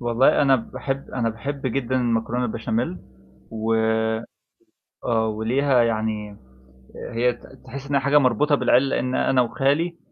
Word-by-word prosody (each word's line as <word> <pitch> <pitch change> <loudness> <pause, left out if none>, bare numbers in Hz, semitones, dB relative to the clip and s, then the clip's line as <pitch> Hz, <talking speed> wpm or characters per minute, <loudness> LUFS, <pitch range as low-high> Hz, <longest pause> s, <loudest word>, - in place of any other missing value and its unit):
والله 120 +4 +3
أنا 135 -2 +5
باحب 135 +3 -5
أنا 120 -3 -1
باحب 135 +4 -5
جدًا 130 0 -2
المكرونة 120 0 0
البشاميل 110 -3 -2 0.5
و 110 0 -1 1.3
آه، 115 -2 +1
وليها 120 +4 +2
يعني 110 -2 -2 0.8
هي 120 +1 +2
ت 120 - -19 0.2
تحس 140 +1 -8
إنها 140 -1 +2
حاجة 140 +2 +3
مربوطة 145 +2 +3
بالعيل 135 -1 +3
لأن 130 -1 -1
أنا 130 -1 +2
وخالي 145 +7 0
125 Hz, 130 wpm, -23 LUFS, 115-135 Hz, 1.3 s, أنا